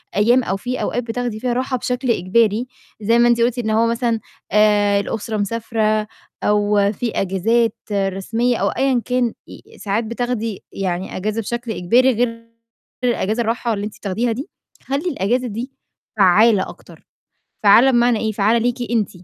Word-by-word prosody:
أيام 240 Hz, +5 st, +4 dB
أو 195 Hz, -2 st, -2 dB
فيه 250 Hz, +5 st, -4 dB
أوقات 245 Hz, -, -2 dB
بتاخدي 235 Hz, -1 st, -3 dB
فيها 245 Hz, 0 st, -1 dB
راحة 255 Hz, +1 st, -1 dB
بشكل 250 Hz, 0 st, -1 dB
إجباري، 220 Hz, +4 st, +1 dB, 0.3 s
زَي 230 Hz, +3 st, +3 dB
ما 240 Hz, -, +5 dB
أنتِ 235 Hz, -1 st, +3 dB
قُلتِ 245 Hz, +1 st, +1 dB
إن 220 Hz, -2 st, -2 dB
هو 225 Hz, +2 st, +3 dB
مثلًا 230 Hz, -1 st, 0 dB, 0.3 s
آآ، 205 Hz, -1 st, +4 dB
الأسرة 220 Hz, +2 st, -3 dB
مسافرة 215 Hz, 0 st, -1 dB, 0.4 s
أو 205 Hz, -1 st, +2 dB
فيه 235 Hz, +2 st, -3 dB
أجازات 215 Hz, +4 st, +1 dB, 0.2 s
رسمية 200 Hz, +5 st, 0 dB
أو -, -, +1 dB
أيًّا 265 Hz, -3 st, +1 dB
كان 250 Hz, -2 st, 0 dB
ي -, -, -14 dB
ساعات 210 Hz, +3 st, -1 dB
بتاخدي 230 Hz, -2 st, -3 dB
يعني 185 Hz, -1 st, -3 dB
أجازة 215 Hz, +4 st, -2 dB
بشكل 235 Hz, +1 st, -4 dB
إجباري 240 Hz, +8 st, +3 dB
غير 230 Hz, 0 st, -2 dB, 0.6 s
الأجازة 235 Hz, -1 st, 0 dB
الراحة 230 Hz, 0 st, -1 dB
اللي 205 Hz, 0 st, -3 dB
أنتِ 210 Hz, -, -8 dB
بتاخديها 225 Hz, +4 st, -1 dB
دي، 260 Hz, +6 st, -5 dB, 0.3 s
خلّي 280 Hz, +7 st, -2 dB
الأجازة 250 Hz, -, -1 dB
دي 235 Hz, +5 st, -5 dB, 0.5 s
فعّالة 205 Hz, +2 st, +4 dB
أكتر، -, -, -15 dB, 0.6 s
فعّالة 235 Hz, +6 st, +7 dB
بمعنى 240 Hz, -2 st, +3 dB
إيه؟ 220 Hz, -1 st, -1 dB
فعّالة 215 Hz, +3 st, +2 dB
ليكِ 245 Hz, 0 st, -2 dB
أنتِ، 220 Hz, -3 st, +1 dB
230 Hz, 160 wpm, -20 LUFS, 210-240 Hz, 0.6 s, فعّالة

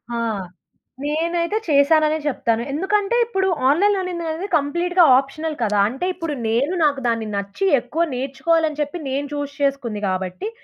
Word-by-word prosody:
ఆ! -, -, -2 dB, 0.9 s
నేనైతే 335 Hz, +6 st, 0 dB
చేశాననే 310 Hz, +1 st, +4 dB
చెప్తాను. 235 Hz, -5 st, 0 dB
ఎందుకంటే, 395 Hz, +7 st, 0 dB
ఇప్పుడు 385 Hz, -4 st, -1 dB, 0.2 s
ఆన్‌లైన్ 400 Hz, +8 st, +3 dB
లెర్నింగ్ 360 Hz, -2 st, -3 dB
అనేది 325 Hz, +5 st, -3 dB
కంప్లీట్‌గా 345 Hz, +5 st, +2 dB
ఆప్షనల్ 310 Hz, +4 st, -2 dB
కదా! 210 Hz, -2 st, +1 dB
అంటే, 265 Hz, +9 st, -4 dB
ఇప్పుడు 330 Hz, -4 st, -4 dB
నేను 260 Hz, +10 st, +1 dB
నాకు 285 Hz, -2 st, +1 dB
దాన్ని 230 Hz, -2 st, -1 dB
నచ్చి, 200 Hz, -, -3 dB, 0.2 s
ఎక్కువ 320 Hz, +8 st, -1 dB
నేర్చుకోవాలని 300 Hz, +4 st, 0 dB
చెప్పి, 295 Hz, +4 st, -3 dB
నేను 275 Hz, +2 st, -1 dB
చూజ్ 285 Hz, -1 st, -4 dB
చేసుకుంది 265 Hz, -7 st, -1 dB
గాబట్టి, 185 Hz, -, -3 dB
300 Hz, 140 wpm, -21 LUFS, 270-340 Hz, 0.9 s, చేశాననే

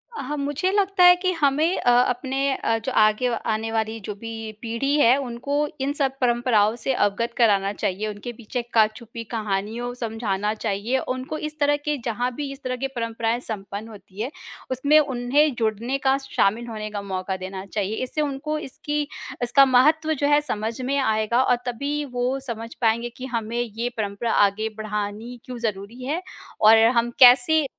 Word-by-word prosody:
अ, -, -, -4 dB
हाँ, 295 Hz, +3 st, -3 dB
मुझे 290 Hz, +6 st, -1 dB
लगता 390 Hz, -2 st, +2 dB
है 355 Hz, 0 st, +9 dB
कि 370 Hz, +1 st, 0 dB
हमें 305 Hz, +5 st, +2 dB
अ, 245 Hz, -, +3 dB
अपने 265 Hz, +2 st, 0 dB
अ, 225 Hz, -, 0 dB
जो 260 Hz, -, -1 dB
आगे 215 Hz, +3 st, +3 dB, 0.2 s
आने 220 Hz, 0 st, -1 dB
वाली 225 Hz, 0 st, -1 dB
जो 210 Hz, -, -4 dB
भी 225 Hz, +2 st, -7 dB, 0.3 s
पीढ़ी 235 Hz, +5 st, -1 dB
है, 245 Hz, -1 st, +6 dB
उनको 255 Hz, +2 st, -4 dB, 0.3 s
इन 280 Hz, +2 st, 0 dB
सब 275 Hz, -3 st, 0 dB
परंपराओं 240 Hz, -3 st, +3 dB
से 245 Hz, +3 st, -1 dB
अवगत 230 Hz, +2 st, 0 dB
कराना 200 Hz, -4 st, +3 dB
चाहिए, 205 Hz, +1 st, -2 dB
उनके 210 Hz, +3 st, -6 dB
पीछे 240 Hz, +2 st, -4 dB
का 220 Hz, -2 st, +6 dB
छुपी 230 Hz, +1 st, -9 dB
कहानियों 220 Hz, +3 st, -2 dB
समझाना 220 Hz, -3 st, -2 dB
चाहिए, 220 Hz, +3 st, -1 dB
उनको 255 Hz, +4 st, -4 dB
इस 305 Hz, 0 st, -6 dB
तरह 290 Hz, 0 st, +3 dB
के 300 Hz, -1 st, 0 dB
जहाँ 245 Hz, +2 st, -1 dB
भी 290 Hz, -2 st, -4 dB
इस 275 Hz, +1 st, -11 dB
तरह 255 Hz, 0 st, -2 dB
की -, -, +1 dB
परंपराएँ 230 Hz, 0 st, -1 dB
संपन्न 210 Hz, -2 st, -6 dB
होती 200 Hz, -1 st, -10 dB
हैं, 255 Hz, +6 st, -3 dB, 0.4 s
उसमें 285 Hz, +4 st, +4 dB
उन्हें 275 Hz, +1 st, +2 dB
जुड़ने 230 Hz, +4 st, -1 dB
का, 270 Hz, -1 st, +2 dB
शामिल 235 Hz, -4 st, 0 dB
होने 215 Hz, -2 st, -5 dB
का 205 Hz, -1 st, -4 dB
मौका 190 Hz, -1 st, -3 dB
देना 190 Hz, +1 st, -7 dB
चाहिए, 205 Hz, +1 st, -2 dB
इससे 280 Hz, +4 st, -2 dB
उनको 300 Hz, +1 st, -2 dB
इसकी 295 Hz, +1 st, -3 dB, 0.4 s
इसका 275 Hz, +3 st, +6 dB
महत्व 310 Hz, +5 st, +4 dB
जो 285 Hz, 0 st, 0 dB
है 295 Hz, 0 st, +4 dB
समझ 225 Hz, -3 st, -3 dB
में 275 Hz, +3 st, -1 dB
आएगा 220 Hz, 0 st, +2 dB
और 245 Hz, -, +3 dB
तभी 280 Hz, +5 st, -2 dB
वो 250 Hz, +2 st, 0 dB
समझ 230 Hz, 0 st, -5 dB
पाएँगे 235 Hz, +1 st, +2 dB
कि 260 Hz, -, -6 dB
हमें 235 Hz, -2 st, -3 dB
ये 235 Hz, +1 st, -3 dB
परंपरा 210 Hz, +2 st, -2 dB, 0.2 s
आगे 215 Hz, +3 st, -3 dB
बढ़ानी 215 Hz, +3 st, -4 dB
क्यों 250 Hz, -1 st, -7 dB
ज़रूरी 225 Hz, +2 st, -4 dB
है? 305 Hz, +7 st, -2 dB, 0.4 s
और 220 Hz, +1 st, +8 dB, 0.2 s
हम 235 Hz, 0 st, +2 dB
कैसे 265 Hz, +5 st, +7 dB
240 Hz, 180 wpm, -23 LUFS, 215-275 Hz, 0.4 s, है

